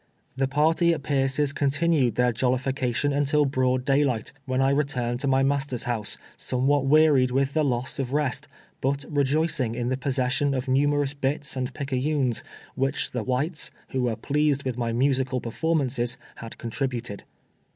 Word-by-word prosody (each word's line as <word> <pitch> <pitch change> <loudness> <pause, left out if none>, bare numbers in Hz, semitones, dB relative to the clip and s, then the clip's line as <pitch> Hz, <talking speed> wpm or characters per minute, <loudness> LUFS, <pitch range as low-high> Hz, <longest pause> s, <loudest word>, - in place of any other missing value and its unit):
The 135 0 +1
party 160 +4 +3
at 150 - -8
Bierce's 140 0 +1
continued 145 -2 +1
their 125 0 +3
Jol 125 +2 +1
lification 135 +1 -1
until 145 +1 +2
broad 130 -2 +1
daylight, 135 -5 +1
when 130 -1 -1
I 135 +1 +3
returned 125 -4 0
to 140 - -1
my 135 0 +3
m'aster's 135 -3 0
house, 115 -4 -2 0.2
somewhat 135 +2 +1
wearied 145 -3 +5
with 135 +2 0
the 155 - +2
loss 130 -1 -1
of 130 -2 -2
rest, 145 -2 -1 0.3
but 140 +1 0
rejoicing 145 -3 0
in 120 0 -2
the 130 - 0
possession 135 +1 0
of 130 0 -3
numerous 145 +1 +2
bits 140 0 -2
and 130 -1 -2
picayunes, 135 -2 -1 0.3
which 135 +1 -1
tlio 125 -2 -4
whites, 145 +6 -1 0.2
who 130 - -1
were 120 -2 0
pleased 140 +4 0
with 130 -3 -2
my 120 -1 -1
musical 130 +1 +1
performances, 125 -2 -1 0.2
had 115 -1 -9
contributed. 120 -3 -4
135 Hz, 160 wpm, -25 LUFS, 125-145 Hz, 0.3 s, wearied